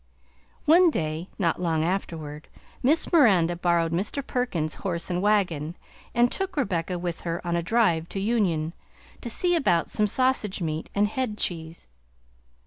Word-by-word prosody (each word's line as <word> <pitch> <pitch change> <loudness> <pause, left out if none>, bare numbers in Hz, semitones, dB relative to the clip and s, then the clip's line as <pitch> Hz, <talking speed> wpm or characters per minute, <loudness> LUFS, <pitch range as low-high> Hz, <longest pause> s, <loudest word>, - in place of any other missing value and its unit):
One 345 +3 +6
day, 160 - -3
not 175 -2 0
long 165 -3 +1
afterward, 160 -4 -3 0.3
Miss 310 +7 +2
Miranda 190 - +5
borrowed 170 -1 +1
Mr. 205 +11 -2
Perkins's 175 -12 -2
horse 175 -2 -3
and 180 0 0
wagon 175 -7 +1 0.4
and 240 +1 +4
took 385 -3 -3
Rebecca 180 - -1
with 175 -1 -4
her 170 0 -3
on 170 0 0
a 170 - +1
drive 170 -5 +1
to 195 - -4
Union, 190 -7 0 0.5
to 235 - -5
see 350 +9 +1
about 175 - +1
some 210 -1 +1
sausage 255 -4 +1
meat 160 -2 -3
and 205 +1 +3
head 220 -1 -3
cheese. 165 -3 -3
180 Hz, 150 wpm, -26 LUFS, 165-235 Hz, 0.5 s, One